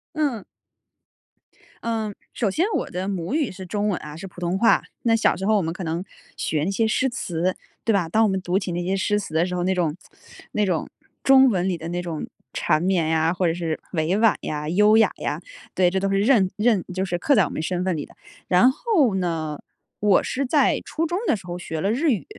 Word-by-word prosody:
嗯。 280 Hz, -9 st, -1 dB, 1.4 s
嗯， 220 Hz, -3 st, -2 dB, 0.2 s
首 215 Hz, -, 0 dB
先 320 Hz, -, +1 dB
我 -, -, -2 dB
的 185 Hz, +2 st, -3 dB
母 180 Hz, +3 st, -3 dB
语 300 Hz, -4 st, 0 dB
是 190 Hz, 0 st, -9 dB
中 205 Hz, +3 st, -1 dB
文 180 Hz, -, -1 dB
啊， 150 Hz, 0 st, -8 dB
是 175 Hz, +5 st, -8 dB
普 180 Hz, -2 st, -11 dB
通 175 Hz, +1 st, -1 dB
话。 230 Hz, +3 st, +4 dB, 0.2 s
那 230 Hz, -1 st, +2 dB
小 -, -, +3 dB
时 190 Hz, -, -4 dB
候 215 Hz, 0 st, +4 dB
我 -, -, +2 dB
们 165 Hz, -1 st, -2 dB
可 185 Hz, -, -7 dB
能 170 Hz, +2 st, -3 dB, 0.3 s
学 155 Hz, -1 st, -1 dB
那 195 Hz, -, 0 dB
些 225 Hz, +3 st, +1 dB
诗 260 Hz, +4 st, +1 dB
词， 180 Hz, -4 st, -2 dB, 0.3 s
对 225 Hz, -, +2 dB
吧。 195 Hz, -5 st, +1 dB
当 220 Hz, +7 st, +3 dB
我 215 Hz, -, +3 dB
们 190 Hz, -1 st, -1 dB
读 180 Hz, +1 st, 0 dB
起 190 Hz, -2 st, -2 dB
那 175 Hz, +1 st, -2 dB
些 190 Hz, +2 st, -1 dB
诗 205 Hz, +2 st, +1 dB
词 195 Hz, -6 st, -7 dB
的 165 Hz, +2 st, +3 dB
时 180 Hz, -, -4 dB
候， 175 Hz, -1 st, -1 dB
那 190 Hz, +1 st, +1 dB
种 170 Hz, -4 st, 0 dB, 0.6 s
那 210 Hz, -, +2 dB
种 180 Hz, -4 st, -1 dB, 0.4 s
中 265 Hz, -1 st, +7 dB
文 185 Hz, -3 st, 0 dB
里 180 Hz, -3 st, 0 dB
的 165 Hz, +1 st, -6 dB
那 175 Hz, +1 st, -2 dB
种 170 Hz, -3 st, -4 dB, 0.3 s
缠 155 Hz, -2 st, +1 dB
绵 175 Hz, -4 st, +1 dB
呀、 160 Hz, +1 st, +2 dB
或 180 Hz, 0 st, -1 dB
者 165 Hz, -, +1 dB
是 165 Hz, -2 st, -2 dB
委 170 Hz, +3 st, 0 dB
婉 225 Hz, -1 st, +5 dB
呀、 150 Hz, 0 st, -3 dB
优 210 Hz, +5 st, +5 dB
雅 220 Hz, -, +5 dB
呀， -, -, -3 dB, 0.3 s
对， 180 Hz, -1 st, +4 dB
这 190 Hz, +1 st, 0 dB
都 195 Hz, 0 st, 0 dB
是 195 Hz, 0 st, +2 dB
认 210 Hz, -5 st, +4 dB
认 210 Hz, -3 st, +2 dB
就 185 Hz, +1 st, -1 dB
是 175 Hz, -2 st, -1 dB
刻 280 Hz, +10 st, +2 dB
在 210 Hz, -, +5 dB
我 155 Hz, -, -2 dB
们 -, -, -4 dB
身 180 Hz, +2 st, -2 dB
份 185 Hz, -3 st, 0 dB
里 145 Hz, -, -4 dB
的。 -, -, -20 dB, 0.3 s
然 185 Hz, +8 st, +5 dB
后 310 Hz, -, +2 dB
呢， 165 Hz, -5 st, -2 dB, 0.4 s
我 205 Hz, -2 st, +4 dB
是 275 Hz, +1 st, -2 dB
在 290 Hz, +3 st, +3 dB
初 325 Hz, -, -2 dB
中 345 Hz, +3 st, -1 dB
的 -, -, +3 dB
时 195 Hz, -, -10 dB
候 175 Hz, 0 st, -5 dB
学 160 Hz, -3 st, -4 dB
了 200 Hz, +2 st, +1 dB
日 285 Hz, +5 st, +2 dB
语。 190 Hz, -, -1 dB
190 Hz, 255 characters per minute, -23 LUFS, 175-215 Hz, 1.4 s, 中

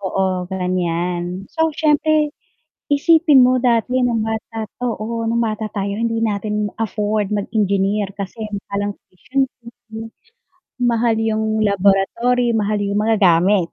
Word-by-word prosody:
Oo, 190 Hz, -2 st, -1 dB
ganyan. 180 Hz, 0 st, -2 dB
So, 320 Hz, 0 st, +2 dB
siyempre 305 Hz, 0 st, +2 dB, 0.6 s
isipin 295 Hz, -1 st, +5 dB
mo 255 Hz, +1 st, +3 dB
dati 245 Hz, 0 st, +1 dB
nung 240 Hz, -3 st, +1 dB
bata 220 Hz, 0 st, -4 dB, 0.2 s
oo, 230 Hz, -1 st, -3 dB
nung 235 Hz, +1 st, +1 dB
bata 215 Hz, -1 st, -2 dB
tayo 200 Hz, 0 st, -3 dB
hindi 230 Hz, 0 st, 0 dB
natin 210 Hz, -1 st, -1 dB
afford 210 Hz, -1 st, -1 dB
mag-engineer 200 Hz, -1 st, 0 dB
kasi 200 Hz, +3 st, -7 dB, 0.3 s
parang 200 Hz, 0 st, -2 dB
yung -, -, -40 dB
tuition 265 Hz, +9 st, -2 dB, 0.2 s
fee, 225 Hz, -2 st, -10 dB, 0.7 s
mahal 235 Hz, -1 st, +2 dB
yung 220 Hz, 0 st, 0 dB
laboratory, 215 Hz, +4 st, +2 dB
mahal 210 Hz, -1 st, 0 dB
yung 200 Hz, 0 st, -1 dB
mga 225 Hz, 0 st, +2 dB
gamit, 180 Hz, 0 st, +4 dB
215 Hz, 125 wpm, -19 LUFS, 200-235 Hz, 0.7 s, isipin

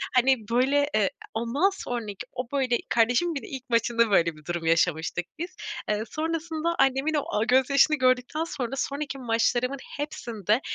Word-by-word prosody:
hani, 260 Hz, +1 st, +5 dB
böyle, 275 Hz, +4 st, +3 dB
eee, 210 Hz, -3 st, +3 dB, 0.2 s
ondan 235 Hz, -, +1 dB
sonraki 235 Hz, -, -5 dB
o, 250 Hz, -1 st, -4 dB
böyle, 260 Hz, -4 st, +2 dB
kardeşimin 245 Hz, +9 st, +2 dB
bir 280 Hz, -, -3 dB
de -, -, -10 dB
ilk 265 Hz, -2 st, -8 dB
maçında 230 Hz, -1 st, +2 dB
böyle 170 Hz, -4 st, +3 dB
bir 155 Hz, 0 st, -17 dB
durum 175 Hz, -1 st, -3 dB
yaşamıştık 165 Hz, +1 st, +1 dB
biz. 355 Hz, +2 st, -5 dB, 0.3 s
Eee, 210 Hz, 0 st, 0 dB
sonrasında 325 Hz, +1 st, -2 dB
annemin 270 Hz, +3 st, +2 dB
o, 295 Hz, -2 st, +1 dB
aaa, 210 Hz, -, +2 dB
gözyaşını 265 Hz, +5 st, +4 dB
gördükten 255 Hz, +4 st, +1 dB
sonra 270 Hz, -6 st, -4 dB
sonraki 280 Hz, +1 st, -3 dB
maçlarımın 245 Hz, +2 st, 0 dB, 0.2 s
hepsinde 230 Hz, -, -1 dB
255 Hz, 155 wpm, -26 LUFS, 225-285 Hz, 0.3 s, hani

